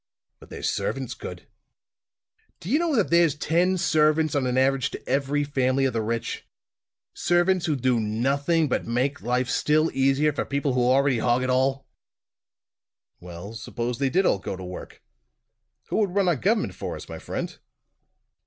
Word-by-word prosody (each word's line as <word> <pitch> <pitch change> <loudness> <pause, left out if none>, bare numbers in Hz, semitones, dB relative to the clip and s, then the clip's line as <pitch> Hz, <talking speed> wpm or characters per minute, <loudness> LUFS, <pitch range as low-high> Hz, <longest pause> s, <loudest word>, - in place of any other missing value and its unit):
"But - - -16
their - - -8
servants - - -2
could. - - -9 1.1
Do 180 +4 -6
you 295 - +4
know 335 -4 0
that 210 -8 +1
there's 170 -4 +4
ten 175 +5 +1
servants, 155 -2 +2
on 135 -3 0
an 125 0 0
average, 135 +1 +2
to - - -9
every 140 +2 0
family 135 -1 +1
of 130 - 0
the 115 - 0
rich? 115 +1 -3 0.7
Servants 175 +1 +1
who 155 - +1
do 130 -2 +1
nothing 140 +9 +1
but 125 - -2
make 130 +4 -1
life 125 +1 0
still 155 +5 +2
easier 135 +3 +2
for - - -1
people 140 -1 -1
who 125 - +1
already 135 0 +3
hog 120 +2 +1
it 130 - 0
all!" 135 +1 +1 1.3
"Well, 90 +4 -9
suppose 120 +1 -4
they 135 -1 +1
did 185 +7 +2
all 100 - +2
go 95 - -5
to 95 - -9
work; 90 0 -9 0.9
who - - -1
would 200 -4 0
run 200 -2 +2
our 175 - +3
government 210 - 0
for - - -5
us, - - -9
my - - -8
friend?" - - -5
135 Hz, 170 wpm, -25 LUFS, 125-160 Hz, 1.3 s, you